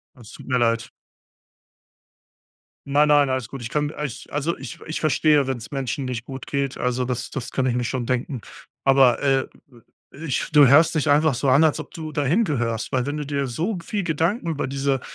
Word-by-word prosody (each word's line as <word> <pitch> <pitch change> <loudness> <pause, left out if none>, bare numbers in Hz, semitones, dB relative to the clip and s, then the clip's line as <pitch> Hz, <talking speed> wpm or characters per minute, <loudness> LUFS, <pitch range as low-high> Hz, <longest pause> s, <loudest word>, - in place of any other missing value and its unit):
Das 120 -4 -14
tut - - -12
mir 125 -1 +1
leid. 115 0 +1 2.0
Nein, 145 +2 +3
nein, 145 -2 +4
alles 130 -4 -2
gut. 135 -3 -8
Ich 115 - -6
kann, 150 -1 0
äh 150 - -5
ich 125 - -10
also 150 +3 -1
ich 165 - -8
ich 160 - -4
verstehe, 150 -2 +3
wenn's 125 -3 -4
Menschen 135 -1 -3
nicht 125 -2 -4
gut 135 -1 -8
geht, 140 -1 -2
also 125 0 -1
das 125 -1 -3
das 130 -2 -5
kann 130 - -1
ich 125 - +1
mir 125 -1 -1
schon 125 +1 -2
denken. 125 0 -2 0.4
Aber, 135 -2 +5
äh, 135 -1 +2 0.7
ich 150 -2 -3
du 145 -3 +7
hörst 155 +6 +5
dich 155 -1 0
einfach 150 -1 +4
so 130 +3 -1
an, 140 +5 +5
als 155 0 +2
ob 150 - -10
du 155 -2 -6
da 145 - -1
hingehörst, 130 - 0
weil 125 -1 +1
wenn 145 +1 -3
du 150 - -3
dir 140 -1 -1
so 170 - -2
g 170 - -9
viel 205 -3 -2
Gedanken 170 +4 0
über 150 -3 -2
diese 135 0 -1
140 Hz, 210 wpm, -23 LUFS, 125-150 Hz, 2.0 s, du